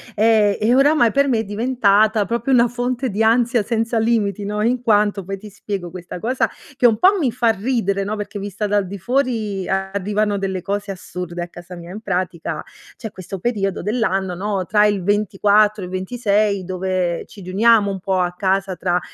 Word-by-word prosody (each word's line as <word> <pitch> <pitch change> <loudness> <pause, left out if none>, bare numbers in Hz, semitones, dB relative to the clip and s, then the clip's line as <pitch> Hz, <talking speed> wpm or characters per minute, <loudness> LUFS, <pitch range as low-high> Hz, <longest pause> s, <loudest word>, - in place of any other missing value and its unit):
ehm, 215 -1 +3
e 230 +4 +3
oramai 275 -3 +4
per 280 0 +3
me 230 -3 +2
è - - -1
diventata 215 -1 +2
proprio 235 +4 -2
una 245 -2 +5
fonte 245 +2 -2
di 215 +2 0
ansia 235 0 +3
senza 230 +1 -1
limiti, 215 -3 0
no, 210 +1 -2
in 245 +2 +1
quanto, 210 -3 +2
poi, 195 +2 -5
ti 210 +2 -11
spiego, 200 -2 -5
questa 180 0 -8
cosa, 250 +7 0 0.3
che 255 - +1
un 225 -3 +5
po' 380 +7 +5
mi 280 -9 +1
fa 235 0 0
ridere, 200 -2 -1
no, 210 +2 -3
perché 205 0 -6
vista 205 +1 -3
dal 205 -1 +1
di 200 +2 -6
fuori 225 -4 -1
arrivano 200 +2 -1
delle 190 -2 -3
cose 200 +1 -3
assurde 180 -2 -6
a 175 - -4
casa 175 +1 -12
mia. 175 +1 -10
In 210 - -7
pratica, 180 -5 -3 0.4
c'è 220 -4 -7
questo 190 0 -8
periodo 195 -3 -1
dell'anno, 195 -3 -1
no, 195 0 -2
tra 210 +3 +3
il 205 -2 +1
24 205 +1 +2
e - - -3
il 180 - -9
26, 200 0 0
dove 185 -1 -2
ci - - -14
riuniamo 205 +3 +3
un 195 -1 -4
po' 190 0 0
a 180 -1 0
casa 190 0 0
tra 180 0 0
205 Hz, 195 wpm, -20 LUFS, 190-230 Hz, 0.4 s, una